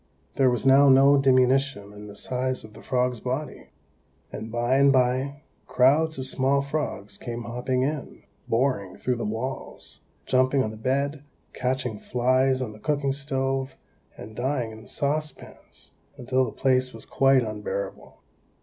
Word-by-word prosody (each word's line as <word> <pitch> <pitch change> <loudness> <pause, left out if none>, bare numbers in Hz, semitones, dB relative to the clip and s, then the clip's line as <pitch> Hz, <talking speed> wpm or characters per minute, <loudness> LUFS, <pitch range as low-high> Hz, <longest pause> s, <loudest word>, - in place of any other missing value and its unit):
There 135 -2 +4
was 125 0 -1
now 135 +1 +7
no 135 +2 +7
diminution 130 -5 +2
in 105 0 -10
the 100 - -11
size 130 +4 -2
of 110 -1 -13
the 110 - -13
frog's 125 -2 0
body; 130 +6 -4 0.6
and 110 +1 -7
by 120 +3 +1
and 140 0 +5
by 130 +2 +1 0.2
crowds 150 +5 +3
of 130 - -4
small 135 +1 +2
frogs 140 -9 -4
came 120 0 -5
hopping 125 +2 -1
in, 145 +1 -4 0.2
boring 115 -6 0
through 125 -1 -1
the - - -3
walls, 115 +5 -5 0.3
jumping 130 +1 +3
on 110 - -3
the - - -9
bed, 140 +5 -1 0.3
catching 125 -3 -2
flies 130 +1 +1
on 115 - -5
the 105 - -13
cooking 145 +2 0
stove, 135 -1 -2 0.4
and 110 +1 -10
dying 125 -2 -1
in 110 0 -11
the - - -16
saucepans, 150 +1 -5 0.3
until 130 +1 +1
the 115 - -5
place 130 -2 +1
was 115 - -9
quite 135 -1 +3
unbearable. 105 -2 -6
130 Hz, 155 wpm, -25 LUFS, 120-135 Hz, 0.6 s, now